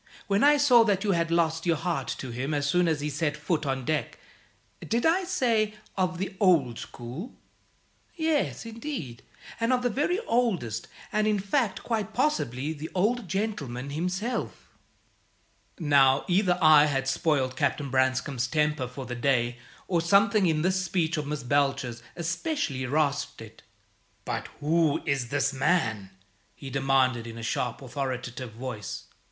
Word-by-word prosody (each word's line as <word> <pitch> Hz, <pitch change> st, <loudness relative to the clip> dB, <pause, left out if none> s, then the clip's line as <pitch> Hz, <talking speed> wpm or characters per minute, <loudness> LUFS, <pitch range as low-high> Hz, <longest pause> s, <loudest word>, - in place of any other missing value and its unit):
When 200 Hz, +3 st, +2 dB
I 295 Hz, +1 st, +6 dB
saw 255 Hz, -5 st, +6 dB
that 200 Hz, -2 st, +1 dB
you 205 Hz, -, +2 dB
had 170 Hz, -2 st, +1 dB
lost 165 Hz, 0 st, +1 dB
your 170 Hz, -, +4 dB
heart 170 Hz, +2 st, -2 dB
to 130 Hz, -, -6 dB
him 135 Hz, +6 st, -2 dB
as 145 Hz, 0 st, 0 dB
soon 180 Hz, +4 st, +3 dB
as 155 Hz, -3 st, 0 dB
he 150 Hz, -, -2 dB
set 150 Hz, 0 st, -1 dB
foot 150 Hz, 0 st, -1 dB
on 135 Hz, -2 st, -2 dB
deck! 155 Hz, +2 st, -1 dB, 0.7 s
Did 230 Hz, +1 st, 0 dB
I 360 Hz, +4 st, +3 dB
say 230 Hz, -, +1 dB, 0.2 s
'of 185 Hz, -2 st, 0 dB
the 195 Hz, +2 st, -4 dB
old 155 Hz, -, +3 dB
school'? 130 Hz, -, -8 dB, 0.8 s
Yes, 320 Hz, -6 st, 0 dB
indeed, 225 Hz, -, -6 dB, 0.4 s
and 230 Hz, +2 st, +1 dB
of 250 Hz, -1 st, +2 dB
the 245 Hz, -, +1 dB
very 300 Hz, -, +1 dB
oldest; 195 Hz, -, 0 dB, 0.3 s
and, 215 Hz, 0 st, +2 dB
in 210 Hz, -1 st, +2 dB
fact, 200 Hz, +3 st, -1 dB
quite 220 Hz, -2 st, -2 dB
possibly 155 Hz, -, 0 dB
the 155 Hz, +1 st, -7 dB
Old 215 Hz, +3 st, +1 dB
Gentleman 145 Hz, -, -3 dB
himself." 180 Hz, -, -3 dB, 1.1 s
Now, 140 Hz, -4 st, +4 dB
either 180 Hz, 0 st, +2 dB
I 155 Hz, -1 st, +8 dB
had 135 Hz, -2 st, -1 dB
spoiled 135 Hz, -3 st, +1 dB
Captain 140 Hz, +1 st, -1 dB
Branscome's 130 Hz, 0 st, +1 dB
temper 150 Hz, -4 st, 0 dB
for 130 Hz, +2 st, -8 dB
the 125 Hz, -, -5 dB
day, 120 Hz, -1 st, 0 dB, 0.3 s
or 175 Hz, -3 st, +1 dB
something 200 Hz, +3 st, +4 dB
in 155 Hz, -2 st, +1 dB
this 185 Hz, +1 st, +1 dB
speech 170 Hz, -3 st, 0 dB
of 150 Hz, -2 st, -3 dB
Miss 150 Hz, -2 st, -3 dB
Belcher's 135 Hz, -3 st, 0 dB
especially 170 Hz, -, -2 dB
rasped 145 Hz, +1 st, 0 dB
it. -, -, -12 dB, 0.6 s
"But -, -, -3 dB
who 155 Hz, 0 st, +2 dB
is 135 Hz, -4 st, -1 dB
this 145 Hz, 0 st, 0 dB
man?" 115 Hz, -, +1 dB, 0.5 s
he 135 Hz, -2 st, -9 dB
demanded, 130 Hz, -3 st, +2 dB
in 115 Hz, 0 st, -8 dB
a 115 Hz, -, -7 dB
sharp, 125 Hz, +3 st, -2 dB
authoritative 130 Hz, -2 st, -4 dB
voice. 115 Hz, -3 st, -6 dB
155 Hz, 155 wpm, -27 LUFS, 135-200 Hz, 1.1 s, I